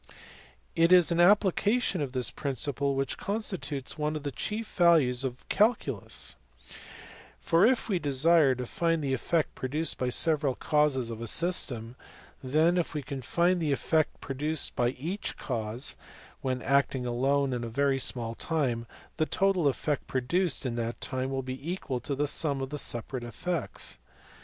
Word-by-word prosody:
It 165 +1 +4
is 180 -2 +7
an 170 - +1
application 200 +2 +3
of 140 -3 -2
this 125 -1 +1
principle 140 -1 -2
which 135 -1 -2
constitutes 185 - -3
one 150 +1 -1
of 150 - -5
the 145 - -3
chief 215 +9 -4
values 155 -8 +4
of 125 -2 -4
the - - -24
calculus; 200 - 0 1.1
for 165 - +4
if 255 -1 +1
we 195 -5 0
desire 145 0 +4
to 125 0 -4
find 165 +4 0
the 135 -1 0
effect 160 +4 0
produced 150 +5 -2
by 125 - 0
several 145 0 +2
causes 145 -6 +1
on 115 0 -7
a 115 - -4
system, 125 - 0 0.5
then, 155 +7 +3
if 165 - -3
we 150 - -2
can 135 -1 -6
find 175 +7 +1
the 155 -3 0
effect 155 +3 +1
pro 135 - -5
duced 150 +2 -2
by 120 0 +2
each 165 +11 -4
cause 115 0 -3 0.5
when 130 -1 -2
acting 135 -1 +1
alone 135 +3 +1
in 120 -1 -3
a 115 - -4
very 135 +3 +1
small 120 -3 -2
time, 125 -5 -1 0.3
the 155 - +1
total 195 -5 +2
effect 140 +1 -1
produced 150 +6 0
in 125 - -1
that 115 0 -3
time 130 0 -2
will 135 0 -2
be 130 +6 -5
equal 140 -9 -3
to 140 +3 -3
the 145 +2 0
sum 145 -1 0
of 135 +1 -4
the 150 - -3
separate 120 +1 -3
effects. 155 +6 -4
140 Hz, 170 wpm, -29 LUFS, 130-165 Hz, 1.1 s, is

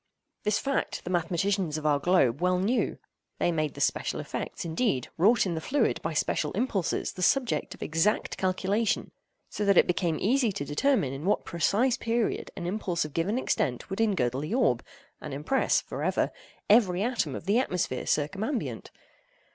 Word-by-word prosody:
This 210 0 +1
fact 275 0 -2
the 180 - -5
mathematicians 175 -1 0
of 155 - -6
our 145 -2 +3
globe 145 -5 +2
well 180 0 +2
knew. 210 +8 0 0.4
They 175 - +1
made 155 -3 -1
the - - -6
special - - 0
effects, - - -5
indeed, 160 - 0
wrought 210 +8 +4
in 180 - -1
the 160 - -3
fluid 285 - +1
by - - -3
special - - 0
impulses, 205 -9 -1
the 185 - -8
subject 250 +6 +1
of - - -7
exact 165 +7 +1
calculation—so 200 +3 -2
that 200 -2 +4
it - - +7
became 175 -2 0
easy 240 +2 +2
to 145 - -4
determine 145 - +1
in 140 +4 -6
what 205 - +1
precise 215 +9 +1
period 230 0 -1
an 175 - -4
impulse 180 -3 -1
of 150 - -8
given 185 - 0
extent 130 - -1
would 195 - -1
engirdle 135 - +1
the 155 +10 -2
orb, 130 - +2 0.4
and 150 -3 -6
impress 150 - +1
(for - - -7
ever) - - +1 0.4
every 200 -4 +4
atom 225 - -1
of - - -7
the 205 +5 +3
atmosphere 180 - -2
circumambient. 200 - -2
185 Hz, 170 wpm, -28 LUFS, 155-220 Hz, 0.4 s, it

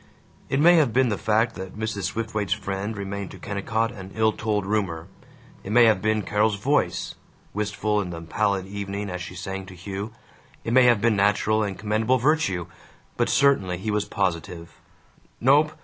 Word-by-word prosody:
It 135 - +1
may 175 +3 +7
have 145 -7 +3
been 130 -1 +3
the 105 - 0
fact 110 +3 +2
that 95 0 -8
Mrs. 105 -3 -3
Swiftwaite's 110 0 -1
friend 100 +2 -4
remained 100 -1 -4
to - - -11
Kennicott 110 +2 -2
an 95 -5 -9
ill 110 0 +3
told 105 -2 -1
rumor, 95 -6 -1 0.6
it 100 - -6
may 120 +1 +7
have 110 -4 +4
been 110 -1 +1
Carol's 105 +1 +1
voice, 135 +9 0 0.4
wistful 105 0 -1
in 90 - -5
the 85 -1 -6
pallid 100 +3 0
evening 100 0 -5
as 90 0 -5
she 90 0 -7
sang 95 +1 -5
to 95 - -11
Hugh, 100 +4 -6 0.5
it 115 - -2
may 130 0 +6
have 120 -4 +4
been 115 -2 +3
natural 105 +2 +2
and 100 -3 -2
commendable 110 +4 +1
virtue, 125 - +1 0.5
but - - +1
certainly 135 -11 +3
he 105 +4 -3
was 105 -1 0
positive: 85 -3 -3 0.7
"Nope. 145 +5 +4
105 Hz, 180 wpm, -24 LUFS, 95-110 Hz, 0.7 s, may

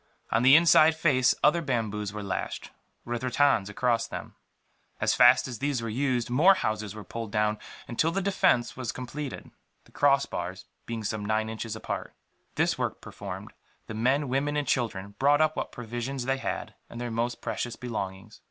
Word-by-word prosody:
On 115 - +3
the 135 +3 +8
inside 160 -1 +6
face 135 -6 +3
other 160 +3 +4
bamboos 110 - -2
were 105 0 -6
lashed, 100 - -4 0.3
with 120 +1 -3
rattans 130 -5 +2
across 115 +2 0
them. - - -7 0.7
As - - +2
fast 125 +1 +6
as 125 -3 -6
these 140 -2 0
were 115 0 -4
used, 125 -1 0
more 160 +11 +5
houses 110 - -2
were 110 - -8
pulled 115 +3 -6
down, 105 0 +1 0.3
until 140 +7 +1
the 185 +4 -1
defence 185 -10 +2
was 125 -3 -3
completed, 135 +3 -6 0.3
the - - -23
crossbars 100 -10 0 0.2
being 115 -2 -4
some 105 0 -3
nine 110 +1 0
inches 110 0 -5
apart. 110 - -5 0.4
This - - +1
work - - -2
performed, - - -8 0.3
the - - -7
men, 130 +6 +1
women 140 +3 0
and 145 - -1
children 100 -6 -1
brought 145 +2 +4
up 155 0 +2
what - - -3
provisions 120 +2 -4
they 135 +1 +1
had, - - -4 0.2
and 120 - -8
their 120 -1 -4
most 120 +1 -2
precious 115 +1 -3
belongings. 105 -3 -6
120 Hz, 175 wpm, -28 LUFS, 110-140 Hz, 0.7 s, the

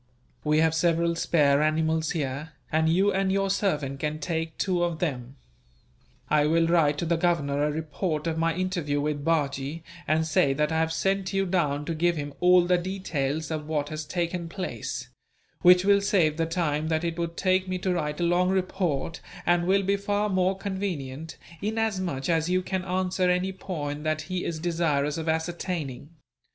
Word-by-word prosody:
We 150 0 +2
have 160 0 +3
several 170 0 +2
spare 145 -4 +3
animals 160 +1 +1
here, 150 0 -3 0.2
and 160 +1 +2
you 195 +4 +3
and 190 0 +1
your 195 0 +1
servant 150 -9 -1
can 150 +1 -2
take 160 -1 -3
two 180 -3 +1
of 170 -2 -1
them. 130 -6 -3 0.9
I 150 -1 +3
will 165 +1 +3
write 165 -3 +3
to 170 - -2
the 170 0 +1
Governor 145 -5 +1
a 150 - +2
report 155 +1 -3
of 165 -1 -1
my 165 0 +1
interview 175 -6 -1
with 145 0 -2
Bajee, 145 -1 -1 0.2
and 160 +1 +2
say 145 -3 +3
that 150 +3 0
I 160 - +1
have 160 0 +1
sent 195 +3 0
you 195 0 +1
down 150 -6 0
to 165 - -2
give 170 +2 +1
him 145 -1 -4
all 180 0 +5
the 180 0 +3
details 160 -5 -2
of 155 -1 -3
what 150 -2 -1
has 155 0 -4
taken 170 +2 -3
place; 185 +1 -5 0.5
which 180 +1 +6
will 200 0 +5
save 170 -6 +2
the 165 -1 0
time 160 -3 -1
that 160 0 0
it 170 0 -2
would 170 0 -3
take 185 0 +2
me 185 0 -2
to 185 0 -1
write 150 -3 -2
a - - 0
long 175 +2 +3
report, 180 -5 -1 0.2
and 175 0 +2
will 195 +1 +3
be 200 +1 +1
far 205 +1 0
more 185 0 +1
convenient, 165 -7 -4 0.2
inasmuch 200 -10 -1
as 165 0 +1
you 185 0 +1
can 190 0 -2
answer 185 0 0
any 180 +1 +1
point 150 -6 -5
that 155 0 0
he 180 +2 -3
is 165 - -2
desirous 160 -3 0
of 160 0 -3
ascertaining. 160 -4 -3
165 Hz, 185 wpm, -26 LUFS, 150-185 Hz, 0.9 s, which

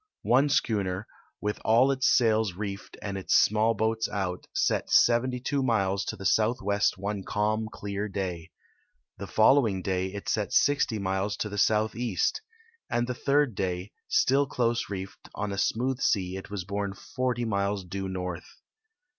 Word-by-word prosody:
One 135 +4 +3
schooner, 100 -6 0 0.4
with 105 0 -2
all 120 +5 +4
its 130 -1 +1
sails 110 -5 +3
reefed 100 +1 -6
and 100 -1 -3
its 95 - +1
small 110 +2 +4
boats 110 +1 0
out, 95 -3 -3
set - - 0
72 125 +3 +3
miles 100 -6 +1
to - - -3
the 95 - -9
southwest 105 -2 +2
one 100 0 -3
calm, 110 +2 -1
clear 100 +1 -4
day. 90 -4 -4 0.7
The - - -6
following 110 -5 +3
day 95 0 -1
it 100 0 -7
set 105 -2 -1
60 140 -5 +3
miles 95 +1 -1
to 105 - -3
the 105 0 -4
southeast, 110 - +1 0.5
and 120 0 +1
the 125 - -3
third 140 0 +1
day, 95 0 -3 0.2
still 140 +2 +3
close 120 -3 0
reefed, 95 -1 -7
on 105 -1 -3
a 100 - -4
smooth 125 +5 0
sea 95 -2 +1
it 95 - -8
was 100 -3 -4
borne 100 0 -3
40 125 +3 -2
miles 100 -2 -1
due 95 +2 -4
north. 90 -2 -5
105 Hz, 155 wpm, -27 LUFS, 95-120 Hz, 0.7 s, all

